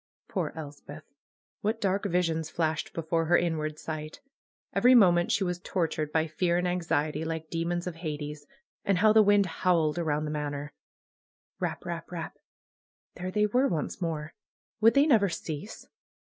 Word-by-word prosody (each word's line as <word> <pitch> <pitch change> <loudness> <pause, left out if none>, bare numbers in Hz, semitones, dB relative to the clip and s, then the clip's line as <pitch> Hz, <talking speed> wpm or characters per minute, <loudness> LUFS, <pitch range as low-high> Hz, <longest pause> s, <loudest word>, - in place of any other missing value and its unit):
Poor - - -2
Elspeth! 145 -1 -9 0.6
What 220 +2 0
dark 200 -1 0
visions 165 -3 0
flashed 160 -1 -1
before 165 0 -1
her 175 +2 +5
inward 155 -3 -1
sight! 155 -1 -6 0.5
Every 250 +1 +6
moment 175 -6 +5
she 200 - +2
was 180 -1 -2
tortured 165 -5 -2
by 160 0 +2
fear 170 +2 0
and 180 - 0
anxiet}^, 160 -3 0
like 160 -1 -4
demons 170 +1 -1
of 175 -2 -5
Hades. 150 -2 -5 0.4
And 195 -2 +2
how 215 +3 +5
the 220 - +7
wind 205 -1 +5
howled 170 -2 +1
around 155 -2 0
the 150 - -3
Manor! 145 -1 -4 0.9
Eap! - - -3
Eap! - - -5
Eap! - - -5 0.8
There 185 +1 -5
they 210 +2 +2
were 250 +6 +2
once 165 - -3
more. 155 -2 -3 0.5
Would 225 +3 +5
they 280 +1 +6
never 220 -10 +4
cease 165 +3 -6
165 Hz, 160 wpm, -28 LUFS, 155-185 Hz, 0.9 s, the